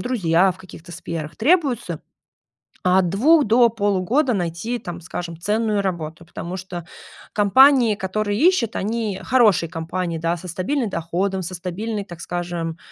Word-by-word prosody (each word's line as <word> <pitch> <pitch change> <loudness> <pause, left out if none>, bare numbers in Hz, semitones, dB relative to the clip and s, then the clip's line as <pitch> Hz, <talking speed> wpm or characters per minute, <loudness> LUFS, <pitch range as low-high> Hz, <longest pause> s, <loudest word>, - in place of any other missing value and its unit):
друзья 190 -7 +2
в - - -19
каких-то 175 -2 -12
сферах, 165 -3 -6
требуется, 245 - +1 0.9
от 180 0 +4
2 290 - +4
до 235 +2 +5
полугода 220 +6 +1
найти 180 +5 -2
там, 175 -6 -7
скажем, 170 -1 -6
ценную 210 +2 0
работу. 170 -3 -4
Потому 175 +2 -6
что 180 -2 -7 0.5
компании, 235 +3 +5
которые 205 +2 -2
ищут, 305 - +3
они 215 -1 -2
хорошие 215 -10 +3
компании 170 +1 -3
да, 165 +1 -1
со 180 - -10
стабильным 220 - -1
доходом, 190 +3 -2
со 185 +2 -5
стабильной, 200 +5 -4
так 175 -3 -11
скажем, 170 -2 -4
190 Hz, 140 wpm, -21 LUFS, 170-225 Hz, 0.9 s, до